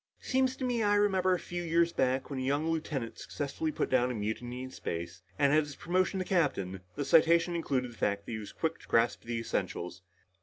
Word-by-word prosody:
"Seems 260 0 +1
to 260 - -3
me 245 -2 0
I 205 -1 +3
remember 190 -3 +3
a - - -4
few 175 0 -5
years 170 0 +2
back 130 +2 0
when 135 - -2
a - - -2
young 140 +4 0
lieutenant 150 -7 -3
successfully 150 +2 -3
put - - -1
down 125 -1 +3
a 125 - -2
mutiny 120 +4 -3
in 130 - -7
space, 85 -4 -5 0.2
and 140 -1 +4
at 155 - +6
his 145 -1 -8
promotion 185 +2 0
to 185 - -1
captain, 100 - 0
the 145 - -2
citation 165 +3 +5
included 130 -7 -1
the 115 - -15
fact 100 0 0
that - - -7
he 110 - -3
was 105 - -8
quick 160 0 -2
to - - -16
grasp 115 +1 +2
the 115 0 -3
essentials." 90 -6 -3
145 Hz, 225 wpm, -31 LUFS, 120-170 Hz, 0.2 s, at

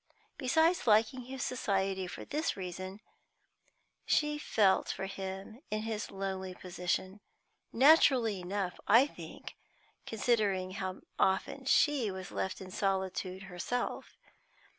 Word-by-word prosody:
Besides 320 +4 +3
liking 225 +3 +3
his 260 +1 -4
society 195 -5 -1
for - - -8
this 305 -3 -1
reason, 185 +2 -6 1.0
she 300 0 +1
felt 200 -9 +3
for 190 - -3
him 195 +4 -6
in 215 0 -2
his 220 -1 -3
lonely 190 -1 -4
position; 185 +2 -3 0.5
naturally 255 - +5
enough, 180 0 -3
I 230 +6 +7
think, 290 - -10 0.5
considering 205 -5 +1
how 190 -1 -4 0.2
often 190 +8 +1
she 270 -4 +3
was 190 -1 -6
left 190 - -3
in 185 -1 -8
solitude 190 -1 -1
herself. 195 +6 -4
195 Hz, 115 wpm, -32 LUFS, 190-245 Hz, 1.0 s, I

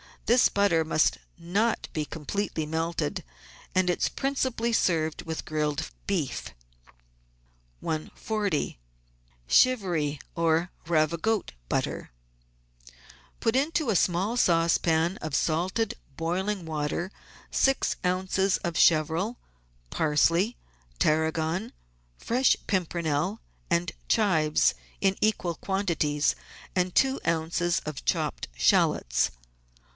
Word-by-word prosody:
This 240 +1 +5
butter 200 -5 +2
must 155 0 +2 0.2
not 200 +7 0
be 155 -1 -1
completely 160 +2 -3
melted, 160 - -2 0.5
and 185 -1 +3
it 180 - 0
is - - +2
prin 275 +1 -2
cipally 235 -3 0
served 160 -7 +1
with 160 -1 -5
grilled 150 0 -2 0.2
beef. 150 - -2 1.3
140— 175 - -2 0.7
CHIVRY 175 - +3 0.2
OR 165 +1 +1 0.2
RAVIQOTE 170 +6 +1 0.2
BUTTER - - -2 1.3
Put 225 +1 +1
into 295 0 +1
a - - 0
small 185 +7 +1
saucepan 165 -1 +2
of 155 -3 -4
salted, 180 +9 0 0.2
boiling 185 +3 -2
water 155 +4 -2 0.4
six 270 0 +2
oz. 190 +1 +1
of 170 -3 -2
chervil, 165 +8 +3 0.5
parsley, 165 +8 +2 0.4
tarragon, 160 - 0 0.4
fresh 250 +3 +2
pimpernel, 175 0 -1 0.3
and 170 0 +1 0.2
chives, 165 -9 +3 0.3
in 195 -1 +2
equal 195 -5 +1
quantities, 165 -7 0 0.4
and 180 -1 0
two 270 0 +3
oz. 165 +1 0
of 155 -2 -5
chopped - - -1
shallots. - - +3
170 Hz, 100 wpm, -27 LUFS, 160-200 Hz, 1.3 s, This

